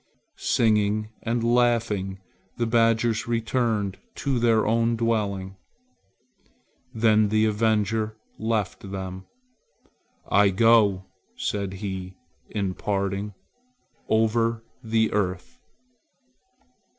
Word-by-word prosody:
Singing 110 -1 +1
and 115 0 -1
laughing, 115 -5 +1 0.4
the 120 - 0
badgers 115 0 +2
returned 115 -4 -1 0.2
to 135 -3 -1
their 115 -2 +3
own 115 +1 +2
dwelling. 100 -5 -1 1.3
Then 110 -2 +3
the 110 +1 +3
avenger 110 0 0 0.2
left 105 -3 -2
them. 95 -1 -6 1.0
"I 100 0 +4
go," 105 -2 +4 0.3
said 100 -2 -3
he 95 -2 -6 0.3
in 100 -3 -2
parting, 100 +1 -2 0.7
"over 115 +1 +1 0.2
the 110 0 +1
earth." 95 - -2
110 Hz, 85 wpm, -25 LUFS, 100-115 Hz, 1.3 s, I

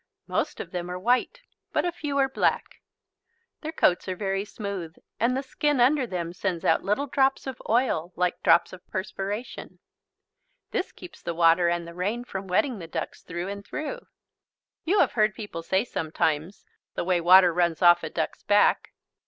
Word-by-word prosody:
Most - - -2
of - - -6
them 180 -1 -4
are 180 - -4
white 250 - +1 0.3
but - - +1
a 350 - 0
few 290 -3 -4
are 270 -1 +4
black. 265 - -1 0.8
Their 315 - -4
coats 180 - +2
are 185 - -2
very 195 0 -1
smooth, 200 -6 -6 0.2
and 245 +3 +2
the 270 - -2
skin 290 +1 0
under 260 +1 +4
them 175 -4 -4
sends 180 -2 -3
out 160 - +3
little 210 +8 0
drops 265 0 +1
of 265 -2 -6
oil 220 -8 +1
like 180 0 0
drops 170 +2 +4
of 185 - -10
perspiration. 195 +4 -5 0.9
This - - -2
keeps 360 - -13
the 170 - -4
water 170 +1 +4
and 170 0 -2
the 170 - -9
rain 205 +7 -2
from 195 -5 -6
wetting 210 +5 +1
the 165 - -8
ducks 160 0 -5
through 175 +3 -5
and 200 0 -6
through. 310 - -6 0.8
You 375 +6 +2
have - - +3
heard 215 -3 +2
people 205 -6 -6
say 190 +6 0
sometimes: 160 -1 -2 0.3
"The - - -1
way 180 -1 +1
water 180 0 +7
runs 170 -1 +1
off 175 0 +7
a 160 - -4
duck's - - -3
back." 205 0 +3
195 Hz, 180 wpm, -26 LUFS, 175-245 Hz, 0.9 s, water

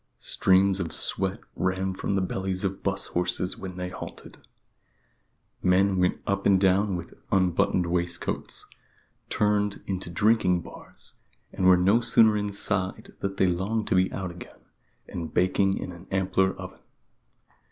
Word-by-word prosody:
Streams 95 +5 +2
of 85 -3 -3
sweat 95 +3 0
ran 95 +1 -1
from 100 +1 -2
the 95 - +1
bellies 95 0 -2
of 95 -1 -2
'bus 100 0 -2
horses 90 +1 -1
when 95 -1 -7
they 90 0 -3
halted. 90 - -10 1.2
Men 95 +1 +3
went 90 0 +1
up 100 0 0
and 95 -1 +5
down 95 +1 +3
with 85 -1 -7 0.2
unbuttoned 90 -1 +2
waistcoats, 85 0 -2 0.6
turned 105 -1 0
into 95 -2 -3
drinking 90 -1 +2
bars, - - -12 0.4
and 95 - +1
were 90 -1 +7
no 100 +6 +3
sooner 110 -2 +4
inside 100 -2 -2
than 100 0 -3
they 95 - +3
longed 95 +5 0
to - - +2
be 95 0 +3
out 95 -2 -4
again, 85 0 -13 0.4
and 80 -2 -6
baking 95 +2 +2
in - - -5
an 85 +1 -12
ampler 95 0 +1
oven. - - -9
95 Hz, 145 wpm, -26 LUFS, 90-100 Hz, 1.2 s, were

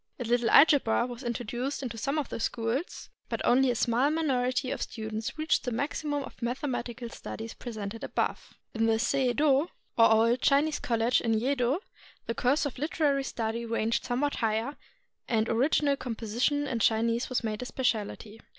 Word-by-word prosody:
A - - -2
little 240 0 +1
algebra 280 -6 +5
was 245 0 -7
introduced 245 +3 -3
into 240 -3 -4
some 275 +7 -2
of 295 -5 -2
the - - -5
schools, 230 +7 -3 0.2
but - - -2
only 260 +2 +4
a 245 - +1
small 240 +4 +2
minority 255 -5 0
of - - -3
students 220 +4 -4
reached 315 +1 +1
the 250 - -2
maximum 290 +3 -2
of - - -12
mathematical 245 -1 -3
studies 225 -1 -7
presented 220 -2 -6
above. - - -3 0.2
In 225 0 +1
the 225 0 +3
Sei 260 +1 +1
Do, 290 +4 +2 0.3
or 230 -1 +6
old 230 +3 +4
Chinese 290 +2 +3
college 235 -3 +1
in 225 -1 +1
Yedo, 260 - +1 0.4
the 230 - -2
course 255 +6 +1
of 280 - -5
literary 290 -2 +1
study 230 -2 -3
ranged 230 0 0
somewhat 265 +4 -1
higher, 225 +5 -1 0.5
and 225 -2 +1
original 280 +4 +2
composition 245 +4 -1
in 245 -4 -2
Chinese 230 +2 +2
was 255 -1 -1
made 215 0 -3
a - - -4
specialty. 225 -3 -2
245 Hz, 170 wpm, -29 LUFS, 225-275 Hz, 0.5 s, or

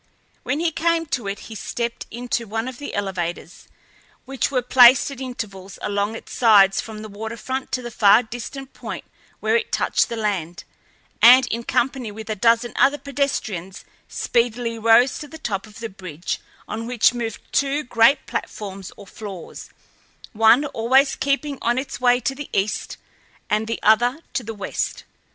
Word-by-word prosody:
When 285 - -2
he 335 0 +1
came 335 +1 +1
to 235 -6 -1
it 195 0 -4
he 225 - -10
stepped 235 +2 -4
into 240 -1 -3
one 225 +3 -3
of 255 -2 -7
the 290 - -6
elevators, 180 -3 -4 0.6
which 265 -2 -1
were 255 -3 0
placed 250 +2 +6
at 270 -1 -9
intervals 200 -7 -7
along 205 +2 -1
its - - -10
sides 200 -5 +5
from 215 -1 -9
the - - -7
waterfront 225 +5 -5
to 255 - -1
the 240 - -6
far 215 +2 +5
distant 245 +4 -8
point - - -7 0.4
where - - +2
it 460 -1 0
touched - - +1
the 235 - -3
land, 180 -7 -3 0.6
and 255 +2 +9
in 235 +1 -2
company 245 -2 -1
with 220 +1 -7
a - - -1
dozen 230 +3 +2
other 280 +2 +4
pedestrians 235 -11 -3 0.2
speedily 235 -1 -1
rose 230 +3 +4
to 300 - -7
the 320 - -10
top 210 -9 -4
of 215 - -15
the 230 - -4
bridge, 180 -4 -5 0.3
on 230 +1 -5
which 245 -1 +3
moved 230 -3 -4
two 280 +2 +1
great 240 +3 +3
platforms 195 -2 -6
or 200 - -12
floors, 195 -3 -9 0.6
one 225 +6 +5
always 270 +1 +2
keeping 280 0 -1
on 240 +1 +1
its 260 -1 -4
way 245 0 +4
to 255 +2 -1
the 285 +1 -8
east, 200 +2 -1 0.5
and 215 +1 +1
the 230 - -3
other 240 +6 +4
to - - 0
the 225 +1 -6
west. 200 - -3
230 Hz, 170 wpm, -22 LUFS, 210-260 Hz, 0.6 s, and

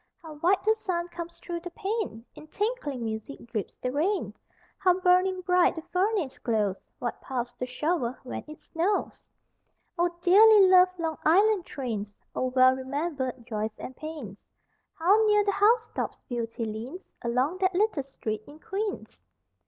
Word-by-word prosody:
How 320 -1 -9
white 360 +7 +2
the 440 - +5
sun 355 -5 -3
comes 340 0 -7
through 345 -1 -5
the 355 +1 -7
pane! 390 - -3
In 305 - -13
tinkling 355 - -2
music 220 +5 -5
drips 225 -4 -4
the 250 - -2
rain! 350 +9 0 0.5
How 365 -1 +3
burning 365 +1 +3
bright 360 -1 +3
the 325 - -6
furnace 365 -5 -1
glows! 210 -5 0 0.2
What 240 - -4
paths 245 -2 -4
to 250 - -2
shovel 260 -1 -1
when 255 - -6
it 305 0 -10
snows! 360 +5 -2 0.8
O 350 - +4
dearly 405 +3 +7
loved 365 0 +6
Long 325 -2 -3
Island 390 +3 +4
trains! 215 -7 -5 0.2
O 255 - 0
well 255 0 +5
remembered 265 -2 -3
joys 215 -2 -3
and 260 - -8
pains.... 295 -11 -7 0.6
How 390 +7 +4
near 420 -1 +4
the 405 - +3
housetops 445 +4 +1
Beauty 230 -1 -3
leans 230 - -6 0.2
Along 255 +9 0
that 375 -1 +1
little 410 -6 +2
street 220 -5 -5
in 290 - -12
Queens! 395 - -4
325 Hz, 155 wpm, -27 LUFS, 250-375 Hz, 0.8 s, dearly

